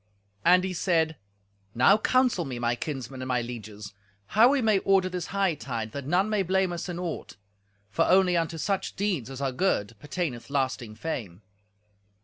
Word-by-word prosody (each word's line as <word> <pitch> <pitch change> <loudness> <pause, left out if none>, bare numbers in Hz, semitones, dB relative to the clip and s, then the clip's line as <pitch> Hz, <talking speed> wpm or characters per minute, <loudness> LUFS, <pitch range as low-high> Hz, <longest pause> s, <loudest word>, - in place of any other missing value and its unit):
And 180 +1 +5
he 190 -1 -2
said, 160 -3 +1 0.6
"Now 130 +12 +6
counsel 250 -5 +2
me, 130 -5 -5
my 120 0 0
kinsmen 130 -1 -5
and 130 - -4
my 125 -1 +1
lieges, 110 -4 -8 0.4
how 225 +4 +7
we 280 0 +2
may 215 -5 +3
order 190 -1 +3
this 180 -2 -4
hightide, 155 - -2
that 140 +2 -6
none 180 +6 +2
may 215 -2 +1
blame 190 0 +1
us 175 +2 -5
in 175 - -4
aught; 175 - -5 0.5
for - - +2
only 185 -1 +4
unto 165 -1 -1
such 190 +4 -2
deeds 185 - -1
as 135 0 -7
are 135 -1 0
good, 125 - 0
pertaineth 145 -4 -4
lasting 130 -5 -2
fame." 110 - -5
165 Hz, 170 wpm, -27 LUFS, 125-190 Hz, 0.6 s, how